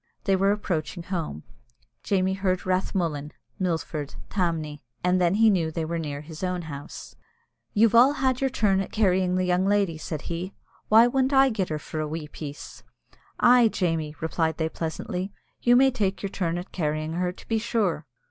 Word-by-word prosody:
They 195 - +3
were 195 +1 +3
approaching 175 -4 -2
home. 165 - -4 0.6
Jamie 190 -1 +1
heard 190 -1 -1
"Rathmullan," 170 -5 -1 0.3
"Milford," 160 -5 -2 0.2
"Tamney," 160 -6 -1 0.2
and 180 +1 +2
then 175 +1 +3
he 220 0 +5
knew 170 -5 +1
they 160 0 -3
were 170 +1 -2
near 145 -3 -4
his 155 +3 -9
own 180 -1 -1
house. 145 -2 -8 0.6
"You've 225 +1 +5
all 250 +5 +7
had 260 -3 0
your 270 - +2
turn 205 -6 +2
at 195 - -6
carrying 185 -4 +2
the 185 0 +1
young 180 +1 +2
lady," 200 -6 +1
said 155 -1 -5
he. 175 +3 -5 0.3
"Why 225 +2 +8
wouldn't 265 +2 +1
I 270 0 +6
get 205 -6 -2
her 155 - -1
for 155 +1 -6
a 155 - -1
wee 155 0 -5
piece?" 145 -1 -8 0.6
"Ay, 245 -1 +6
Jamie," 165 -7 -1
replied 160 0 0
they, 160 -1 0
pleasantly, 180 +4 -4 0.3
"you 240 0 +5
may 265 +2 +6
take 200 -7 -1
your 200 - -3
turn 175 -4 -1
at 175 +2 -7
carrying 155 -1 -2
her, 180 +1 0
to 180 - -15
be 225 -1 +1
sure." 205 -9 -1
180 Hz, 185 wpm, -26 LUFS, 160-205 Hz, 0.6 s, Why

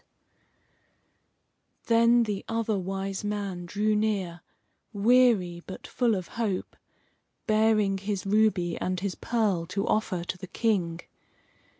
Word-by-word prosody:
Then 235 +1 +5
the 210 -3 -3
Other 225 -1 0
Wise 195 +1 -4
Man 200 -4 -3
drew 210 +3 +1
near, 195 -5 -1 0.5
weary, 205 -5 +3
but 190 - -8
full 240 -4 +1
of 185 -3 -5
hope, 215 -5 -3 0.7
bearing 215 -3 +2
his 200 0 -3
ruby 195 -4 +2
and 185 0 -1
his 195 0 -2
pearl 205 -8 -1
to 195 +3 -2
offer 200 -5 0
to 180 +1 -5
the 185 - -8
King. 175 -6 0
200 Hz, 115 wpm, -27 LUFS, 185-220 Hz, 0.7 s, Then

